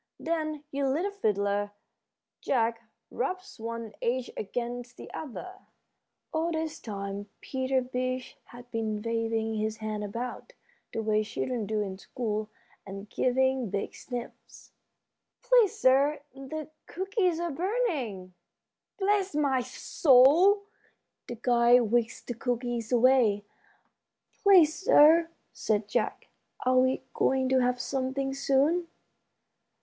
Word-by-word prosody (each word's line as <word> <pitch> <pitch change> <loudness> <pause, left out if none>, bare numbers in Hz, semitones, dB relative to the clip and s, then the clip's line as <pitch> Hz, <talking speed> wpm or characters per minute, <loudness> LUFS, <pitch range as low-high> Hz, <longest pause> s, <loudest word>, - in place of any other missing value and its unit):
Then 310 -2 -2
your 275 -1 0
little 340 +9 0
fiddler, 205 - 0 0.7
Jack, 230 -3 0 0.3
rubs 370 +7 -4
one 230 -1 -5
edge 250 +1 -1
against 240 +3 -5
the - - -10
other." 365 +6 -7 0.7
All 325 +1 0
this 320 0 -3
time 200 -1 -6
Peter 260 -1 -1
Beech 255 0 -3
had 245 0 -14
been 215 -2 -2
waving 225 -1 -1
his 215 0 -2
hand 215 -1 -4
about, 240 - -6 0.4
the 225 - -3
way 215 0 +2
children 225 +1 -3
do 215 0 0
in 190 -1 -6
school, 215 -1 -3 0.3
and 195 +1 -9
giving 260 -2 +1
big 200 +1 -3
sniffs. 245 -2 -9 0.7
"Please, - - +4
sir, 275 +3 +3
the 290 +3 -7 0.2
cookies 375 -2 0
are 345 -1 -2
burning." 285 - -2 0.6
"Bless 395 -4 +1
my 275 -4 +2
soul!" 290 +10 +4 0.6
The 240 - -5
guide 235 -1 +4
whisked 240 -1 0
the 245 - -4
cookies 240 -1 -3
away. 240 -4 +4 1.0
"Please, 365 -7 +6
sir," 330 -6 +5 0.2
said 210 -1 -1
Jack, - - -2 0.4
"are 255 0 +4
we 260 +1 +2
going 265 0 +2
to 260 0 +4
have 250 0 +1
something 270 +1 -2
soon?" 280 +6 +2
255 Hz, 115 wpm, -28 LUFS, 225-305 Hz, 1.0 s, Please